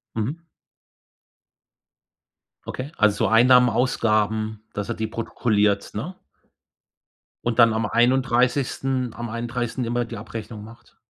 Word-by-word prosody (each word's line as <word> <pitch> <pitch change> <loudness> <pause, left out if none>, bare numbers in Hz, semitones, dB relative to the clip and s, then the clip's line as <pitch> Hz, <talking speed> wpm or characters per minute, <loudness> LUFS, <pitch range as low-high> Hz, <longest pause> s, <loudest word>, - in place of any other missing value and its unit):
Mhm. 135 +10 -3 2.2
Okay, 135 +5 -6
also, 105 -1 +2
Einnahmen, 125 +2 +6
Ausgaben, 110 -3 0
dass 105 -1 -4
er 120 - -2
die 110 0 -3
protokolliert, 105 -3 0
ne? 150 - -5 1.3
Und 120 -1 -1
dann 115 -1 +6
am 115 0 0
31., 125 +1 +1
am 120 0 -5
31. 120 +2 -3
immer 120 +1 -1
die 115 0 -8
Abrechnung 110 0 -8
macht? 115 +2 -16
115 Hz, 110 wpm, -23 LUFS, 110-125 Hz, 2.2 s, Einnahmen